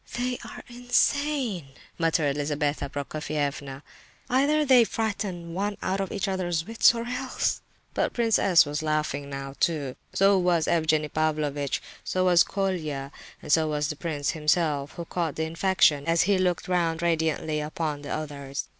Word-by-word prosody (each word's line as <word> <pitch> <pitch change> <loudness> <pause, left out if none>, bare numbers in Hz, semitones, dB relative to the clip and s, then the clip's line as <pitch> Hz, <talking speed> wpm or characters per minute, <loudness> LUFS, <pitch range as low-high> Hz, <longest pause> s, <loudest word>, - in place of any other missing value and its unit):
"They 250 0 -1
are - - -9
insane," 245 - 0 0.3
muttered 160 -4 +1
Lizabetha 145 -1 -1
Prokofievna. 145 -1 -4 0.5
"Either 290 +4 +3
they 255 -3 +7
frighten 200 -7 -3
one 205 +3 -2
out 190 +1 -1
of 195 -1 -2
one's 185 -4 -1
wits, 230 +2 +4
or 230 0 -3
else—" 255 +1 -2 0.3
But - - 0
Prince 230 -2 +2
S. 180 -5 +5
was 150 +1 -3
laughing 155 -2 -1
now, 135 0 -6
too, 150 -7 0 0.2
so 195 0 +4
was 175 -3 +2
Evgenie 155 -2 +2
Pavlovitch, 150 -3 -1 0.2
so 185 0 0
was 175 -2 +6
Colia, 155 -8 -3 0.3
and 150 - -4
so 160 0 +4
was 150 -1 -1
the 150 - -3
prince 145 -3 -2
himself, 150 -2 0
who 170 - -6
caught 165 -3 -2
the 160 - -1
infection 165 -3 +2
as 165 0 +4
he 195 0 +2
looked 180 -2 0
round 170 -2 0
radiantly 160 -2 0
upon 150 -1 -3
the 145 - -8
others. 140 -3 -4
165 Hz, 155 wpm, -26 LUFS, 150-195 Hz, 0.5 s, they